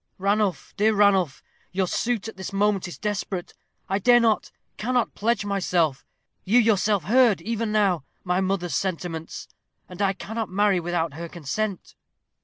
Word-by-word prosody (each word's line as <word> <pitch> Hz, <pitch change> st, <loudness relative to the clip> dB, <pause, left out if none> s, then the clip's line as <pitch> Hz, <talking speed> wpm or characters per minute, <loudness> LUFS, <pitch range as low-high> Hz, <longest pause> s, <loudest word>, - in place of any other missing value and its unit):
"Ranulph, 200 Hz, -1 st, 0 dB
dear 215 Hz, +1 st, +3 dB
Ranulph, 195 Hz, -8 st, +3 dB, 0.3 s
your 190 Hz, 0 st, 0 dB
suit 225 Hz, +4 st, -1 dB
at 220 Hz, -, -8 dB
this 190 Hz, +1 st, -6 dB
moment 195 Hz, -1 st, +1 dB
is 175 Hz, -, -8 dB
desperate. 200 Hz, -3 st, -3 dB, 0.3 s
I 195 Hz, +1 st, 0 dB
dare 240 Hz, +4 st, +6 dB
not, 225 Hz, -2 st, +2 dB, 0.3 s
cannot 245 Hz, +3 st, 0 dB
pledge 215 Hz, -1 st, 0 dB
myself. 175 Hz, -8 st, 0 dB, 0.4 s
You 215 Hz, +6 st, +3 dB
yourself 215 Hz, -4 st, +3 dB
heard, 230 Hz, +2 st, +4 dB
even 230 Hz, -1 st, -2 dB
now, 195 Hz, -8 st, +2 dB, 0.2 s
my 180 Hz, +1 st, +1 dB
mother's 185 Hz, -2 st, -1 dB
sentiments, 165 Hz, -3 st, -3 dB, 0.4 s
and 180 Hz, +1 st, -8 dB
I 195 Hz, -1 st, +2 dB
cannot 220 Hz, +3 st, -5 dB
marry 200 Hz, 0 st, +2 dB
without 170 Hz, -2 st, -2 dB
her 170 Hz, +3 st, -7 dB
consent." 180 Hz, +5 st, -4 dB
195 Hz, 150 wpm, -24 LUFS, 180-215 Hz, 0.4 s, dare